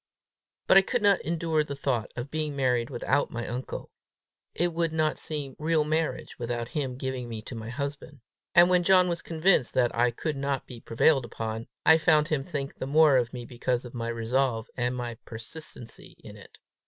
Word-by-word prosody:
But - - +6
I - - +9
could 240 +3 -2
not 200 -2 +4
endure 165 -1 0
the 140 -1 -6
thought 130 -6 -1
of 125 +3 -6
being 155 -2 -2
married 125 -3 +1
without 135 +2 0
my 120 -1 -5
uncle: 125 +2 -5 0.6
it 175 0 0
would 165 -1 0
not 155 -1 0
seem 145 -4 -4
real 155 0 +2
marriage 155 -1 -2
without 120 0 -3
his 145 -3 -2
giving 130 -2 -4
me 110 -2 -6
to 125 - -8
my 115 -1 -6
husband. 140 +2 -5 0.3
And 175 0 +8
when 180 0 +4
John 185 0 +5
was 170 -1 -2
convinced 165 -5 +2
that 125 -2 +2
I 120 +1 +3
could 145 +5 -3
not 140 -1 -2
be 120 -2 -10
prevailed 135 +5 +3
upon, 110 -1 -5 0.2
I 160 0 +7
found 155 -1 +3
him 150 -3 0
think 140 -3 -4
the 130 - -3
more 150 0 +5
of 120 -2 0
me 120 -1 -7
because 125 +1 -2
of 120 - -10
my 115 -2 -4
resolve, 115 0 -1
and 125 0 -1
my 120 -2 -5
persistency 115 +1 -8
in - - -10
it. - - -15
135 Hz, 195 wpm, -27 LUFS, 120-155 Hz, 0.6 s, I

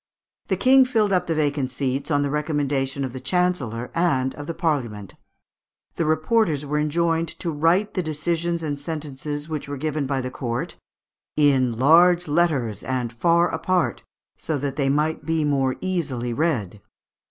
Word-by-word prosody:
The - - 0
King 265 +1 +6
filled 220 -5 +1
up 180 -1 +1
the 165 - 0
vacant 145 -3 0
seats 135 +2 -2
on 145 -2 +2
the 140 - -1
recommendation 145 -3 -1
of 125 - -6
the 130 - -6
Chancellor 130 -7 -1
and 135 -7 +1
of 145 0 -8
the 165 - -3
Parliament. 120 - -2 0.8
The 165 - 0
reporters 155 0 +1
were 150 +1 -1
enjoined 165 +2 +1
to 170 - -3
write 165 +7 +2
the 185 - 0
decisions 170 +1 -2
and 145 -2 -3
sentences 145 -1 -5
which 155 -3 -5
were 145 - -4
given 150 0 -2
by 135 -1 -1
the 130 0 -5
court 120 -2 -3 0.6
"in 130 -6 +3
large 170 +6 +5
letters, 145 - +1
and 125 -2 -3
far 170 +8 +3
apart, 170 +2 0 0.3
so 155 - -3
that 140 0 -3
they 140 -2 +1
might 150 +3 0
be 160 0 0
more 135 -3 +1
easily 140 -10 -2
read." 115 - -1
150 Hz, 165 wpm, -23 LUFS, 135-165 Hz, 0.8 s, King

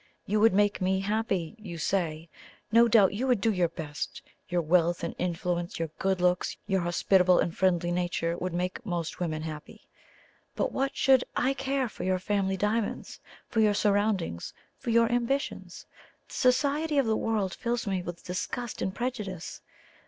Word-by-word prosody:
You 210 +2 +1
would 220 -2 +5
make 205 0 +2
me 190 +1 +1
happy, 200 -4 -1
you 185 -6 -7
say. 165 -1 -1 0.4
No 230 +1 +6
doubt 210 -4 +5
you 245 +6 -1
would 250 -4 +3
do 220 +2 +2
your 180 -2 +2
best 160 -3 -6 0.3
your 175 -1 0
wealth 170 +1 +2
and 170 - -2
influence, 175 0 -2
your 165 -1 -2
good 190 -1 +1
looks, 180 0 +1
your 195 -2 +1
hospitable 180 +1 +3
and 170 - 0
friendly 175 -2 +2
nature 175 -1 -1
would 185 +1 -3
make 180 +7 -2
most 175 -6 -3
women 155 -3 -2
happy. 155 -1 -8 0.7
But - - 0
what 270 +1 -1
should 265 -2 +5
I 265 +2 +2
care 270 -1 -1
for - - -8
your 185 0 +1
family 195 0 0
diamonds? 210 +2 -2 0.3
for 225 - -1
your 210 -2 +4
surroundings? 200 - 0 0.2
for - - -5
your 230 0 +4
ambitions? 245 +4 -2 0.4
The - - -12
society 285 +4 +2
of 275 - +4
the 220 -1 +2
world 215 -5 -1
fills 235 0 -2
me 190 -3 -1
with 175 -1 -7
disgust 225 +6 -4
and 190 - -2
prejudice. 210 -8 -4
195 Hz, 170 wpm, -28 LUFS, 175-230 Hz, 0.7 s, No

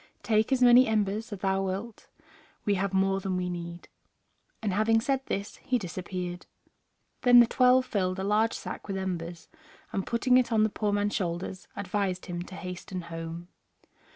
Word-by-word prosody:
Take 220 +2 +2
as 255 -1 +3
many 245 +1 +7
embers 215 0 0
as 200 -3 -6
thou 195 0 +1
wilt, 195 +4 -5 0.6
we 205 - +3
have 195 0 0
more 195 0 +2
than 190 -1 -2
we 180 0 -2
need." 170 0 -7 0.7
And 210 -4 -2
having 220 +3 +3
said 270 +3 0
this 200 +2 -3
he 255 - 0
disappeared. 180 -2 -5 0.7
Then 245 -1 +8
the 240 - +8
twelve 255 +2 +4
filled 185 -5 -1
a 190 - -3
large 215 +3 +2
sack - - -7
with 195 -1 -3
embers, 175 -3 -4 0.5
and, 195 - -1
putting 250 +2 +3
it 255 -2 +2
on 220 -1 +4
the 215 - +3
poor 210 0 -1
man's 205 0 0
shoulders, 180 +1 -3
advised 195 -1 -2
him 175 -1 -4
to 185 +1 -9
hasten 180 +1 -6
home. 165 +1 -7
195 Hz, 175 wpm, -28 LUFS, 180-220 Hz, 0.7 s, Then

